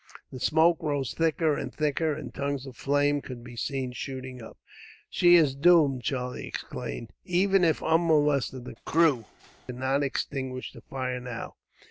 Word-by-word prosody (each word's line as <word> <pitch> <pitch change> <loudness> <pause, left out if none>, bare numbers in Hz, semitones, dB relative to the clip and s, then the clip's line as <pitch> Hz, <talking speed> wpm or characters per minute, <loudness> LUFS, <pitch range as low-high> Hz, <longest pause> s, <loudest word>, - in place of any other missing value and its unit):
The 130 - -7
smoke 160 +5 +3
rose 145 -5 -1
thicker 160 -1 +1
and - - -4
thicker, 155 +1 0
and 140 -5 -8
tongues 140 -1 -3
of 130 -2 -10
flame 145 +1 +1
could 125 -3 -9
be 120 0 -10
seen 130 +1 -3
shooting 130 0 -6
up. 110 - -11 0.5
"She 175 0 +6
is 155 -6 +5
doomed," 145 -3 +4
Charlie 125 +1 -3
exclaimed. 115 - -6
"Even 190 +1 +2
if 160 -2 +2
unmolested, 150 -6 +2
the - - -7
crew 155 -8 +3 0.4
could 125 - -6
not 130 +2 +1
extinguish 130 -2 -3
the - - -12
fire, 130 -1 -4
now. 125 -2 -6
140 Hz, 155 wpm, -27 LUFS, 130-160 Hz, 0.5 s, She